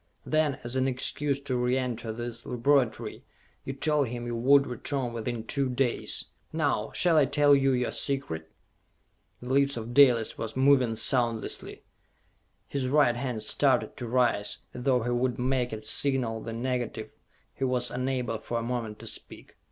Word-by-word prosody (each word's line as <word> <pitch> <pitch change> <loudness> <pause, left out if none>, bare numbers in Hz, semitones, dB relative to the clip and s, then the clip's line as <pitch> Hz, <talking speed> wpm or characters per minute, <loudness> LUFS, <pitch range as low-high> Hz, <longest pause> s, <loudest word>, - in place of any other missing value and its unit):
Then, 155 -3 +1
as 120 +2 -2
an 130 0 +1
excuse 135 +2 0
to 135 -2 -3
re 125 +1 +1
enter 120 -3 -3
this 120 +1 -6
laboratory, 125 0 0 0.4
you 135 - -4
told 145 0 +1
him 120 +1 -5
you 120 0 -3
would 140 +4 +5
return 125 0 -3
within 115 0 -4
two 135 +3 -1
days! 125 -1 -1 0.3
Now, - - 0
shall 170 -3 +4
I 150 - +6
tell 145 +1 +4
you 135 -1 +4
your 125 -2 0
secret?" 80 - -3 0.9
The 125 - -7
lips 140 -1 +2
of 115 +1 -6
Dalis 125 -5 +4
were 115 - -3
moving 130 -3 +3
soundlessly. 115 0 0 0.8
His 135 -2 -2
right 140 -3 +3
hand 120 -3 -3
started 130 +3 +1
to 120 - -5
rise, 120 -4 +1 0.2
as 125 - -7
though 125 -4 +3
he 120 - -1
would 120 0 0
make 125 0 0
it 110 -1 -6
signal 125 -4 +3
the 115 - -6
negative 125 0 -3 0.4
he - - -5
was 125 -2 0
unable 125 -3 -2
for 120 - -4
a 115 - -2
moment 115 -3 -3
to - - -10
speak. - - -7
125 Hz, 165 wpm, -28 LUFS, 120-135 Hz, 0.9 s, I